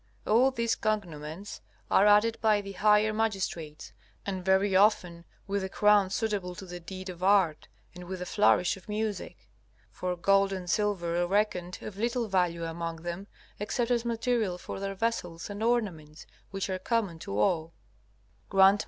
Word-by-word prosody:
All 240 +5 +4
these 235 -3 0
cognomens 175 -3 -4 0.3
are 200 - +5
added 210 +2 +4
by 215 -2 +4
the 200 -1 -7
higher 210 +2 +3
magistrates, 190 -8 -3 0.3
and 190 -2 -3
very 190 +1 +3
often 185 -4 +3 0.2
with 200 -1 -2
a 190 - -3
crown 205 -1 +4
suitable 200 -4 -2
to 190 - -9
the 175 -1 -8
deed 185 +2 -7
or 180 0 -10
art, 190 -6 +3 0.3
and 180 0 -10
with 190 +1 -5
the 180 - -5
flourish 180 -2 +3
of 190 +1 -16
music. 210 -1 -4 0.4
For 180 0 -3
gold 195 +3 +3
and 185 -2 -5
silver 175 -4 0
are 175 - +1
reckoned 185 -2 0
of 195 - -7
little 235 +2 -1
value 180 -4 0
among 165 0 -5
them 175 +3 -5 0.3
except 235 +4 -1
as 235 -1 +2
material 230 -5 0
for 180 - -7
their 195 0 -4
vessels 190 -5 -3
and 205 +1 -6
ornaments, 190 -10 -1 0.2
which 195 0 -3
are 185 -1 -3
common 200 -5 -1
to 100 - -5
all. 160 +8 +1 0.8
G.M. 195 +1 +6
195 Hz, 165 wpm, -29 LUFS, 175-210 Hz, 0.8 s, G.M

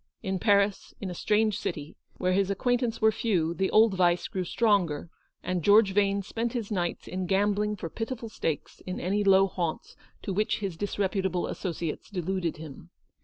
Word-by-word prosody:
In 190 -2 -2
Paris, 200 -1 +2
in 190 -3 -4
a - - -4
strange 210 +3 +1
city, 150 +1 -5 0.2
where 185 0 +1
his 195 0 +2
acquaintance 240 +3 0
were 220 0 +5
few, 185 -7 0
the 190 +2 0
old 220 -1 +5
vice 175 -2 +2
grew 185 - -3
stronger, 175 -8 +1 0.3
and 180 -1 -1
George 205 +2 +5
Vane 200 0 +2
spent 230 +4 -3
his 230 -4 -4
nights 175 -4 -2
in 185 0 -3
gambling 205 +2 +1
for 185 - -5
pitiful 225 +6 -5
stakes 160 -8 -4
in 185 - -3
any 200 +4 0
low 195 -1 +6
haunts 175 -4 -4 0.3
to 195 - -3
which 215 +2 +1
his 195 -5 -4
disreputable 190 -1 -1
associates 170 -4 -4
de 185 -5 -4
luded 180 -2 -2
him. 145 - -10
195 Hz, 175 wpm, -28 LUFS, 180-210 Hz, 0.3 s, low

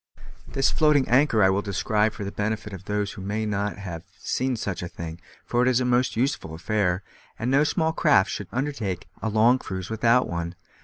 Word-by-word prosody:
This 135 - +1
floating 150 -4 +3
anchor 125 -4 +4
I 95 - +5
will 100 +1 +1
describe 105 +2 0
for - - -6
the 100 - -4
benefit 105 0 -3
of 95 -1 -9
those 105 0 -1
who - - -9
may 105 +3 -2
not 100 0 -2
have 90 -5 -6 0.2
seen 130 +6 -1
such 100 -5 -3
a 90 - -4
thing, 85 0 -8 0.2
for 120 - +1
it 125 - +3
is 130 -1 +3
a 125 - 0
most 125 +1 +2
useful 115 - -1
affair, 95 +1 0 0.3
and 120 +3 -1
no 140 +2 +5
small 160 +1 +1
craft 145 - +4
should 105 - -4
undertake 120 - -3
a 110 - -1
long 115 +4 +4
cruise 95 -1 -6
without 115 +3 +3
one. 85 0 -4
105 Hz, 205 wpm, -25 LUFS, 95-125 Hz, 0.3 s, I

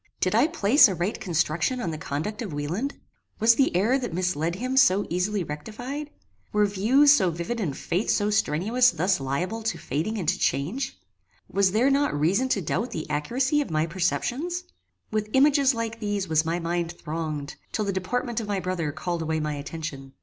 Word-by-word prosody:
Did 185 - +1
I 235 +7 +4
place 285 -4 +5
a 190 - -2
right 175 +5 -2
construction 170 - 0
on 175 -8 -2
the 155 - -5
conduct 165 - -4
of 210 -7 -4
Wieland? 170 - -3 0.4
Was 225 +2 +6
the 265 -5 +2
error 225 +9 +3
that 240 -10 -4
misled 175 -2 -1
him 255 +6 -3
so 205 -6 +5
easily 185 +3 0
rectified? 245 - -6 0.4
Were 210 0 +3
views 240 +9 +5
so 190 -10 +3
vivid 170 +8 -4
and 155 -10 -2
faith 185 +6 -2
so 210 0 +2
strenuous 215 +7 +3
thus 185 -2 +1
liable 170 +12 -2
to 220 0 -2
fading 160 - -2
and 180 -6 -4
to 190 +3 +1
change? 170 - -1 0.5
Was 195 -1 +2
there 240 +7 +3
not 280 - +1
reason 195 - +2
to 200 -7 0
doubt 200 - -1
the 155 - -5
accuracy 255 - +1
of 285 - -4
my 155 0 +1
perceptions? 245 - -1 0.5
With 215 -1 -1
images 275 -1 +4
like 230 0 -3
these 205 -3 -2
was 155 -1 +2
my 165 +1 0
mind 170 0 -2
thronged, 155 -3 -5 0.2
till 215 - -1
the 200 - -1
deportment 235 +5 -2
of 220 - -5
my 200 -2 -1
brother 180 -5 -2
called 170 +3 -3
away 160 0 -1
my 150 -1 -2
attention. 145 -2 -6
195 Hz, 190 wpm, -25 LUFS, 165-235 Hz, 0.5 s, Was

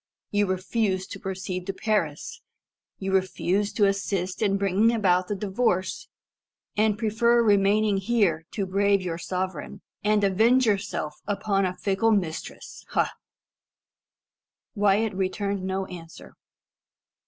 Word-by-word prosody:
You 205 0 +2
refuse 190 +1 -1
to - - -9
proceed 185 -1 -5
to 195 - -2
Paris. 190 -8 -2 0.6
You 195 0 -3
refuse 190 +1 +1
to 210 - +3
assist 195 -2 -1
in 200 -2 +2
bringing 200 +3 +3
about 185 -5 +2
the 205 - -2
divorce, 190 -1 -1 0.7
and 210 0 +2
prefer 235 +2 +3
remaining 205 0 +3
here 195 -6 +1
to 200 - -1
brave 200 +1 +2
your 170 -2 -3
sovereign, 185 -1 -4 0.2
and 210 0 +2
avenge 225 +7 +4
yourself 195 -8 -2
upon 200 -1 0
a 180 0 -5
fickle 200 +4 +1
mistress. 175 -6 -4
Ha?" - - 0 1.6
Wyat 205 +1 +2
returned 195 +1 -2
no 190 0 -2
answer. 170 -3 -11
195 Hz, 120 wpm, -26 LUFS, 185-210 Hz, 1.6 s, avenge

